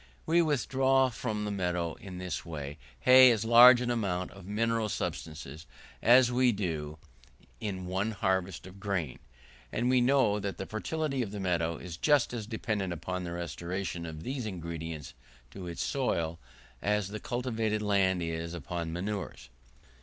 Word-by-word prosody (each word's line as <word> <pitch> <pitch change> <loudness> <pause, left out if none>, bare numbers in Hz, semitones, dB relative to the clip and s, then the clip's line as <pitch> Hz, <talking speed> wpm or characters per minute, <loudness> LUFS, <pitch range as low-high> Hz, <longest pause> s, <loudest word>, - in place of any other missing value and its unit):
We 170 +2 +4
withdraw 135 -3 +2
from 110 -3 -3
the 105 - -2
meadow 90 -4 -1
in 95 -2 -9
this 90 0 -3 0.6
hay 130 0 +9
as 115 -2 0
large 120 +2 +9
an 120 0 0
amount 95 -6 -1
of 95 -2 -13
mineral 115 +1 0
substances 80 -3 -5 0.3
as 125 +1 +6
we 125 0 +4
do 80 -7 -3 0.6
in 95 -3 -4
one 95 +4 -1
harvest 95 -4 -1
of 95 +1 -12
grain, 95 -9 -2 0.5
and 120 +2 +1
we 130 -1 +4
know 120 -5 +3
that 100 -1 -4
the 95 - -4
fertility 135 +5 -2
of 110 - -2
the 105 0 -6
meadow 85 -3 0
is 85 -2 -8
just 145 - +3
as 110 -3 -4
dependent 105 -4 -2
upon 90 +2 -4
the 85 - -5
restoration 85 0 -4
of 80 0 -8
these 130 -3 -3
ingredients 80 -5 -6 0.4
to 95 -2 -8
its 85 - -3
soil, 85 -12 -1 0.4
as 105 -2 0
the 105 +1 -5
cultivated 115 -3 -2
land 95 -3 +2
is 85 +1 -3
upon 85 +1 -4
manures. 95 -7 -4
100 Hz, 155 wpm, -30 LUFS, 85-120 Hz, 0.6 s, hay